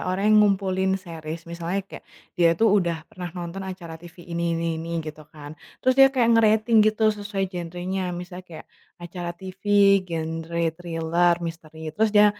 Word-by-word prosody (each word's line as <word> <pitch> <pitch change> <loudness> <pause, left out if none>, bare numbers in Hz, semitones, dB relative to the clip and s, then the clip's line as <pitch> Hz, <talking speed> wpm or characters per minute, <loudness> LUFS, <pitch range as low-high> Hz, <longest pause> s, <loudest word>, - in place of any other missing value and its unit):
orang 185 +2 -1
yang - - +7
ngumpulin 190 -2 +2
series. 165 -1 -7
Misalnya 170 +2 -3
kayak, - - -11 0.3
dia 170 -2 +5
tuh 225 +3 +4
udah 170 -2 -1
pernah 180 -2 -8
nonton 175 +2 -5
acara 175 -3 -8
TV 175 0 -13 0.2
ini 170 0 0
ini 170 - -2
ini, 165 - -7 0.2
gitu 155 0 -8
kan. 145 -2 -10 0.3
Terus 255 - +5
dia 270 - +9
kayak 255 -4 +1
ngerating 220 0 +4
gitu, 215 0 +3
sesuai 205 -1 -3
genrenya. 180 +2 -4
Misalnya 180 +1 -8
kayak 165 -2 -10 0.4
acara 175 0 -5
TV 190 +1 -10 0.5
genre 165 0 -3 0.2
thriller, 170 0 +1
misteri. 160 -1 -8
Terus 220 +7 +2
dia 210 0 +8
175 Hz, 165 wpm, -24 LUFS, 165-195 Hz, 0.5 s, dia